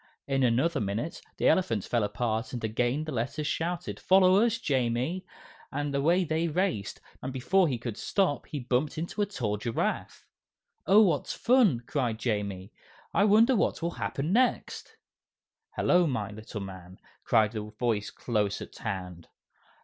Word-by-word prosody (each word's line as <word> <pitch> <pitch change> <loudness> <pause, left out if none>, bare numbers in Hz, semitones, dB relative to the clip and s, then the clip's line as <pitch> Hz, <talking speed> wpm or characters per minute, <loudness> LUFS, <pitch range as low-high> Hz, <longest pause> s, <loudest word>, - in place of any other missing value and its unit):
In 135 -1 0
another 135 +6 +2
minute 110 - -3 0.2
the - - +2
elephant 115 - +2
fell 120 -3 0
apart 110 +3 -2
and 120 - -5
again 120 +6 0
the 155 - -5
Letters 135 +5 -2
shouted, 170 +3 -2
"Follow 185 0 +5
us, 230 -1 +1
Jamie!" 135 - -1 0.4
and 145 0 -2
away 165 +7 +3
they 160 0 0
raced, 165 - -1 0.2
and 130 - -4
before 170 +9 +2
he 130 -5 -1
could 120 -2 -6
stop 180 -10 0
he 150 - -5
bumped 125 +4 -1
into 170 +6 -3
a 205 - +1
tall 115 - -2
giraffe. 115 +2 -3 0.6
"Oh, 205 +4 +7
what 165 -9 +1
fun!" 230 - +3
cried 120 -6 -1
Jamie. 105 -3 -3 0.4
"I 200 - +4
wonder 225 +5 +5
what 200 - 0
will 170 - 0
happen 155 +1 -2
next?" 255 +2 0 0.8
"Hello, 180 -1 +3
my 110 -7 -2
little 110 0 -7
man!" 95 -2 -9 0.3
cried 110 -1 +3
a 110 - -3
voice 105 0 -2
close 105 -4 -1
at - - -10
hand. 90 -5 -5
130 Hz, 155 wpm, -28 LUFS, 110-170 Hz, 0.8 s, Oh